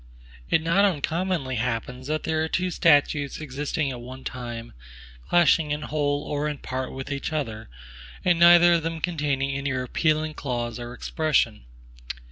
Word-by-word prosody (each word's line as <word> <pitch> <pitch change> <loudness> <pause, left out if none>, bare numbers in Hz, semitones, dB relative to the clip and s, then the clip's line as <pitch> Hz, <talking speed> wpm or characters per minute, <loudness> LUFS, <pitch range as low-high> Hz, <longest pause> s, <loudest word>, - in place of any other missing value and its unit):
It 160 - +2
not 170 +5 +3
uncommonly 165 -5 0
happens, 125 +2 -3
that 155 +1 -1
there 160 0 0
are - - -1
two 185 +2 -1
statutes 145 -3 +3
existing 145 0 -2
at 125 -2 -7
one 130 +2 -9
time, 120 -2 -6 0.6
clashing 165 -2 +4
in 150 +1 -2
whole 145 -1 -1
or 145 0 -2
in 150 -1 -3
part 130 -1 -4
with 135 +1 -6
each 140 +2 -3
other, 115 - -4 0.6
and 175 -2 +3
neither 175 0 +8
of 170 - +2
them 165 +1 -3
containing 145 -5 -1
any 140 0 -2
repealing 155 +4 0
clause 120 -5 -3
or 120 0 -7
expression. 130 - 0
145 Hz, 155 wpm, -25 LUFS, 130-160 Hz, 0.6 s, neither